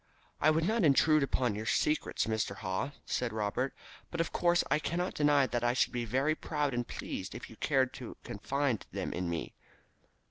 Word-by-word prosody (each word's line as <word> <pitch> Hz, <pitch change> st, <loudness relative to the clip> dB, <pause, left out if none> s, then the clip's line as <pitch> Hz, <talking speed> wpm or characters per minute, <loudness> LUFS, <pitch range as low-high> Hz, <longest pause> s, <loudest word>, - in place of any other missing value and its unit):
"I 155 Hz, -, +5 dB
would 160 Hz, +1 st, +2 dB
not 220 Hz, 0 st, +2 dB
intrude 155 Hz, +1 st, +5 dB
upon 130 Hz, -4 st, +1 dB
your 110 Hz, +2 st, -5 dB
secrets, 150 Hz, -, +1 dB
Mr. 110 Hz, -2 st, -1 dB
Haw," 95 Hz, +6 st, -2 dB, 0.2 s
said 125 Hz, -2 st, -1 dB
Robert, 110 Hz, +5 st, -1 dB, 0.4 s
"but 170 Hz, -, -5 dB
of 165 Hz, -, 0 dB
course 175 Hz, -1 st, +3 dB
I 150 Hz, -, +4 dB
cannot 175 Hz, +4 st, -1 dB
deny 145 Hz, -2 st, +4 dB
that 120 Hz, -2 st, -2 dB
I 120 Hz, 0 st, +3 dB
should 125 Hz, -, +1 dB
be 120 Hz, -1 st, -1 dB
very 135 Hz, +7 st, +1 dB
proud 150 Hz, -3 st, -1 dB
and 120 Hz, 0 st, -1 dB
pleased 95 Hz, 0 st, -5 dB
if 120 Hz, -, -8 dB
you -, -, -11 dB
cared 135 Hz, -3 st, +2 dB
to -, -, -8 dB
confide 140 Hz, -5 st, -1 dB
them -, -, -3 dB
to 90 Hz, -, -3 dB
me." 85 Hz, -2 st, -3 dB
135 Hz, 190 wpm, -32 LUFS, 115-155 Hz, 0.4 s, I